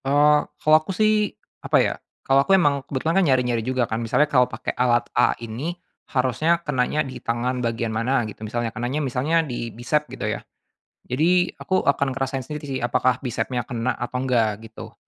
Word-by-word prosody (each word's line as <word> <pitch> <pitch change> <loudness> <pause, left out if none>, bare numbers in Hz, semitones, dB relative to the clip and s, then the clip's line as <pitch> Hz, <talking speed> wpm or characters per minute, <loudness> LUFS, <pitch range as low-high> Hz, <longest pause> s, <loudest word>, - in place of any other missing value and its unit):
Eee, 145 +2 +5 0.2
kalau 155 0 +4
aku 155 - -19
sih, 215 -1 +3 0.3
apa - - +2
ya, - - +2 0.3
kalau 135 +1 +4
aku 195 +7 +4
emang 145 -6 +2
kebetulan 160 +7 +1
kan - - +3
nyari-nyari 125 -3 +2
juga 130 +1 0
kan. 115 0 -3
Misalnya 115 +6 +2
kalau 125 -4 +3
pakai 110 +1 -4
alat 120 -1 +2
A 120 - +3
ini 120 +10 -5 0.3
harusnya 135 +6 +2
kenanya 145 +2 0
di 130 -2 -8
tangan 125 +2 -1
bagian 115 -1 -1
mana 120 +2 +1
gitu 105 - -11
misalnya, 115 +1 -3
kenanya 120 +6 -2
misalnya 150 +4 +1
di 120 -4 -4
bisep 150 +7 -1
gitu - - -5
ya. - - -2 0.7
Jadi, 175 +7 +3
aku 185 - 0
akan 140 -1 +1
ngerasain 135 0 -3
sendiri 150 -1 -6
sih, 135 -1 -2
apakah 125 +1 +1
bisepnya 125 -1 -3
kena 120 -1 -2
atau 120 +1 -4
enggak 115 -5 +1
gitu. 110 0 -10
130 Hz, 185 wpm, -23 LUFS, 120-150 Hz, 0.7 s, Eee